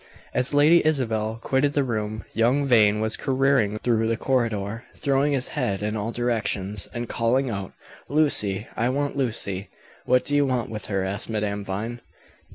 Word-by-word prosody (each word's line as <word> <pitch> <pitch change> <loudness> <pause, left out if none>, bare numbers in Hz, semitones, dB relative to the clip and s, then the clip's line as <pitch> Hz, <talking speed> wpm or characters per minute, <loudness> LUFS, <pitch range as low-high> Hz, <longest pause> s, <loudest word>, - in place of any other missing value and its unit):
As 125 +1 +1
Lady 150 +4 +5
Isabel 115 -7 0
quitted 140 +2 +1
the 145 - +2
room, 110 -3 -3
young 125 +5 +2
Vane 105 -5 +4
was 110 0 0
careering 135 -6 +1
through 115 0 +1
the 115 0 0
corridor, 115 -4 -1
throwing 140 0 +1
his 130 -2 0
head 105 -9 -2
in 105 +1 -1
all 110 +2 -2
directions, 110 -5 -1
and 120 0 -4
calling 120 +4 +1
out, 100 -3 -5 0.4
"Lucy! 110 -10 +1
I 120 +2 +1
want 145 +2 -1
Lucy!" 105 -7 -2 0.4
"What 125 0 +3
do 145 - 0
you 145 -1 +3
want 125 -3 -1
with 105 -3 -6
her?" 95 -2 -1
asked 100 +4 -2
Madame 105 -2 -2
Vine. 110 +5 -4
115 Hz, 165 wpm, -24 LUFS, 105-135 Hz, 0.4 s, Lady